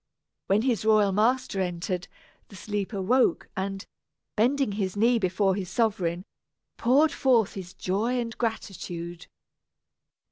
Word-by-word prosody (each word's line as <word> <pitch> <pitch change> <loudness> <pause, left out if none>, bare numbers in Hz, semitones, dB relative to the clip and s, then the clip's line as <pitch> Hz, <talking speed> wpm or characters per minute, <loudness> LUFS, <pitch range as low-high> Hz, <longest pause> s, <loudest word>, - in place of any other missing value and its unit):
When 205 +3 +3
his 245 -5 +1
royal 215 -2 +4
master 215 0 +1
entered, 180 0 -3 0.4
the 200 - -14
sleeper 205 +1 -3
woke 235 0 +2
and, 195 0 -3 0.5
bending 255 +2 +2
his 200 -1 -3
knee 235 +3 +4
before 190 0 +1
his 185 -2 -4
sovereign, 185 -4 0 0.5
poured 280 +6 +3
forth 240 -6 +2
his 185 -2 -8
joy 220 +7 -1
and 230 -1 -4
gratitude. 175 -7 -4
205 Hz, 120 wpm, -27 LUFS, 185-230 Hz, 0.5 s, royal